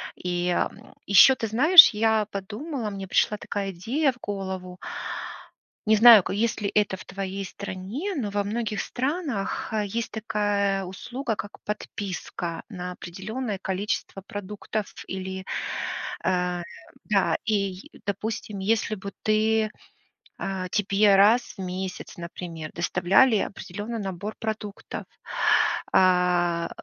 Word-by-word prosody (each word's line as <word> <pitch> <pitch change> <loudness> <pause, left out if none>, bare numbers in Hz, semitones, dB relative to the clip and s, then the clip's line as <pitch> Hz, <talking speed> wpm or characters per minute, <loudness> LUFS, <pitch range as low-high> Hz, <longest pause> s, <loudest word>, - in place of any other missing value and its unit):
И, 180 0 -2
м, 175 - -2
ещё, 200 +7 +8
ты 230 -3 -3
знаешь, 310 - +9
я 220 0 +2
подумала, 220 - -4
мне 195 -1 -6
пришла 210 +3 +2
такая 200 -1 -3
идея 255 - 0
в - - -20
голову. 190 -2 -5 1.1
Не 215 0 +5
знаю, 225 -1 +10
к - - -4
есть 220 +3 0
ли 200 - 0
это 205 -2 +2
в - - -12
твоей 195 0 -4
стране, 200 - -5
но 225 -8 -2
во 205 0 0
многих 215 +1 -2
странах, 265 - -2
э, 215 -1 0
есть 230 +4 -3
такая 205 -2 0
услуга 235 +6 -4
как 205 - -6
подписка 185 -4 -5
на 180 -3 -6
определённое 200 +6 -5
количество 195 0 -3
продуктов 210 0 -5
или, 190 0 -5 0.8
э 180 -1 0 0.4
да. 185 -6 +2
Ий 195 -3 -1 0.2
допустим, 210 +1 -3
если 215 +2 +1
бы 200 0 -7
ты, 215 0 +2 0.7
э, 190 -1 -3
тебе 200 0 +4
раз 220 +5 +4
в - - -4
месяц, 185 0 -5
например, 170 -2 -7
доставляли 190 +8 +4
определённый 205 +4 -5
набор 195 +2 -4
продуктов, 215 -2 -5 0.9
а, 180 -2 +3
200 Hz, 125 wpm, -26 LUFS, 185-220 Hz, 1.1 s, знаю